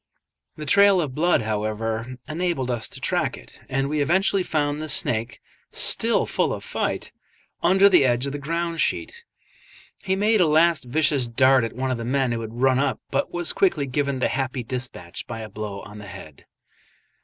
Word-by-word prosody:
The 155 - -7
trail 200 +5 +5
of 150 -6 -2
blood, 165 -3 +2
however, 110 +3 -3
enabled 155 -5 -1
us 120 -2 -3
to - - -10
track - - -1
it, - - -16
and 135 +1 0
we 150 +1 -1
eventually 190 +6 +2
found 150 -3 -1
the 155 - -5
snake, 115 -3 0 0.3
still - - +1
full - - 0
of - - -6
fight, - - -3 0.5
under 190 +3 +5
the 185 -7 +5
edge 125 0 +1
of 140 - -3
the 145 - -5
ground 170 +3 -2
sheet. 470 0 -1 0.8
He 190 -1 -1
made 210 +1 +3
a 170 - +4
last 160 -1 +3
vicious 140 -1 +2
dart 130 +2 +4
at 115 - -3
one 130 +1 -2
of 125 - -2
the - - -4
men 130 +1 0
who 115 -1 -2
had 115 +2 -7
run 130 -1 +4
up, 145 - 0
but - - -1
was 175 -1 -1
quickly 175 -7 +2
given 140 +1 -1
the 130 - 0
happy 130 -1 -2
despatch 120 -8 -6
by 115 - -6
a 110 - -7
blow 105 -2 -6
on 105 0 -11
the 105 - -10
head. 80 -6 -12
135 Hz, 190 wpm, -23 LUFS, 120-165 Hz, 0.8 s, trail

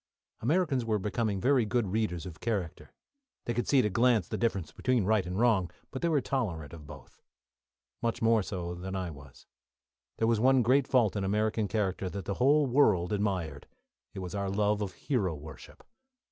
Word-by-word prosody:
Americans 145 -1 +1
were 110 -2 0
becoming 105 0 -1
very 130 +2 +3
good 110 -1 0
readers 100 -6 -1
of 85 -4 -9
character; 100 -8 -3 0.5
they 120 - -1
could 120 +1 -2
see 140 - +3
at 130 - +4
a - - +1
glance 115 -2 +3
the - - -4
difference 95 -9 -1
between 125 +5 0
right 105 -3 +2
and 90 +3 -3
wrong, 110 -7 +3 0.2
but 130 - -5
they 170 - +1
were 155 -3 +3
tolerant 95 - -3
of 75 -3 -11
both. 70 -4 -13 0.8
Much 115 -1 -1
more 115 -1 +3
so 90 -3 -4
than 95 +2 -6
I 90 -3 -3
was. 70 -3 -14 0.7
There 115 - +1
was 115 -2 +2
one 130 +1 +4
great 130 +3 +3
fault 115 -7 +3
in 100 - -1
American 105 +2 0
character 95 -3 -1
that 95 0 -6
the 100 - -2
whole 145 +3 +5
world 110 -9 +3
admired; 95 -8 -2 0.5
it - - -5
was 90 -1 -6
our 100 -1 -2
love 105 +1 +1
of 95 -3 -3
hero 95 - -1
worship. 75 -2 -12
105 Hz, 190 wpm, -30 LUFS, 90-120 Hz, 0.8 s, whole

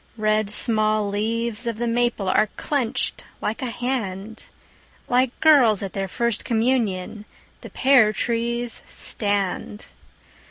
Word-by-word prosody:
Red 215 -1 +1
small 215 -1 +2
leaves 225 +3 -2
of 230 -2 -2
the 240 +1 -2
maple 235 -4 0
Are 215 +2 +2
clenched 270 -6 -1 0.2
like 215 - -3
a 255 - -3
hand, 225 -4 -4 0.6
Like 250 0 +1
girls 250 -11 +5
at 195 - -5
their 195 -1 -3
first 235 +3 -1
communion 220 -4 -1 0.4
The - - -10
pear 255 -5 +4
trees 235 +1 -2
stand. 205 0 -2
225 Hz, 120 wpm, -22 LUFS, 210-240 Hz, 0.6 s, girls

